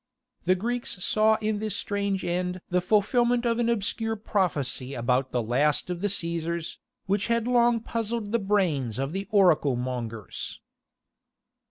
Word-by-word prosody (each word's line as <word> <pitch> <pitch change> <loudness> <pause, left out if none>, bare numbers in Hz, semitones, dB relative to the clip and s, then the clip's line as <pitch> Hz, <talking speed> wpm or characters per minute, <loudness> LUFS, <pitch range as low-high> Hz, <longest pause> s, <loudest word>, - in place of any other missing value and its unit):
The 185 +1 +4
Greeks 230 -2 -3
saw 220 0 +4
in 215 -1 0
this 215 -1 -2
strange 200 -3 -1
end 180 +1 -1
the 180 0 +2
fulfilment 240 +5 +2
of 230 0 +1
an 235 -1 +2
obscure 225 0 0
prophecy 155 - -1
about 125 +2 0
the 120 -2 0
last 145 +9 +1
of 175 -1 -4
the 205 - +1
Caesars, 170 -3 -2 0.3
which 200 +1 0
had 230 -1 +1
long 240 -1 +4
puzzled 230 -2 -3
the 235 - +2
brains 175 - 0
of 135 +2 -2
the 195 +2 -4
oracle 175 - +4
mongers. 120 -4 -5
195 Hz, 150 wpm, -27 LUFS, 150-220 Hz, 0.3 s, The